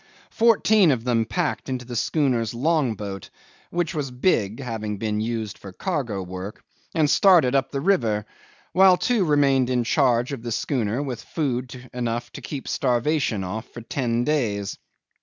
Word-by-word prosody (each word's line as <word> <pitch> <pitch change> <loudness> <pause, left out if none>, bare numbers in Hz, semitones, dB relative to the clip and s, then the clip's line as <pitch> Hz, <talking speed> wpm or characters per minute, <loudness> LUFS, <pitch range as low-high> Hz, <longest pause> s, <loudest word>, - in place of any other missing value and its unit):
'Fourteen 220 -4 +4
of 125 -5 +1
them 120 -2 +1
packed 165 +2 -2
into 125 -1 -3
the 120 0 -7
schooner's 120 -3 0
long 140 -2 +1
boat 100 -2 -7 0.4
(which 175 -1 -1
was 145 -4 -2
big, 125 - 0
having 110 -5 -4
been 105 0 -1
used 110 -2 -3
for 100 - -10
cargo 120 - -3
work) 95 +3 -7 0.3
and 155 -2 +3
started 170 -6 +5
up 135 -1 +2
the 140 - -3
river, 115 - +1 0.5
while 190 -1 +6
two 230 +2 +1
remained 140 -5 +3
in 125 -1 +1
charge 125 0 +2
of 130 - -5
the 120 0 -5
schooner 120 +1 -1
with 130 -4 -5
food 125 -4 -3
enough 120 -1 -3
to - - -9
keep 140 -3 -6
starvation 125 -4 0
off 110 +6 -5
for 120 - -9
ten 120 0 -1
days. 110 -9 -1
125 Hz, 160 wpm, -24 LUFS, 115-150 Hz, 0.5 s, while